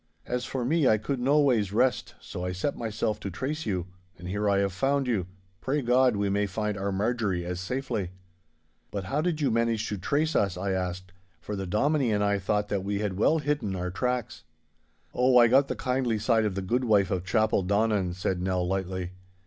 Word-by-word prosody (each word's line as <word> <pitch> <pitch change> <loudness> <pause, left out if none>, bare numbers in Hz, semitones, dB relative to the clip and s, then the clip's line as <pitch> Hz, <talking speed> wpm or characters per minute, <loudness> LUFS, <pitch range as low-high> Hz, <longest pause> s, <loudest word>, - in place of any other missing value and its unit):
As 125 0 -2
for 130 -3 -3
me, 155 +1 +2
I 110 - +5
could 125 +6 -3
noways 130 -6 +3
rest, 125 +5 +1
so 90 - -7
I 90 0 -2
set 95 +11 -2
myself 110 -1 -2
to 100 - -5
trace 135 - -4
you. 90 -4 -1 0.3
And 90 +1 -9
here 105 +2 0
I 100 - +3
have 100 -1 +1
found 135 +6 +1
you. 105 -8 -1 0.3
Pray 140 +5 -1
God 125 0 +4
we 100 0 0
may 100 +1 +1
find 105 +2 -2
our 100 0 -2
Marjorie 100 -3 -1
as 90 0 -4
safely!' 115 -2 -3 0.8
'But 100 -2 -4
how 140 +11 -1
did 160 -2 -1
you 140 - +2
manage 115 -1 +1
to 105 - -3
trace 150 - 0
us?' 100 -3 +1
I 95 +2 -2
asked, 90 0 -3 0.3
for 105 +5 -5
the 95 -1 -4
Dominie 135 - +1
and 105 -1 +1
I 100 0 +1
thought 105 +2 0
that 100 -2 -1
we 100 +1 -1
had 100 -2 -2
well 155 +8 +4
hidden 145 -10 -1
our 90 0 -3
tracks. 125 +3 -2 0.7
'Oh, 125 0 +4
I 120 -1 +8
got 135 +4 +4
the - - -3
kindly 125 -3 0
side 110 +1 +2
of 100 -3 -1
the 95 - -3
goodwife 105 -2 +2
of 90 -2 -1
Chapeldonnan,' 100 -2 +1
said 90 0 -2
Nell, 90 -1 0
lightly. 95 -1 -2
105 Hz, 205 wpm, -27 LUFS, 95-125 Hz, 0.8 s, I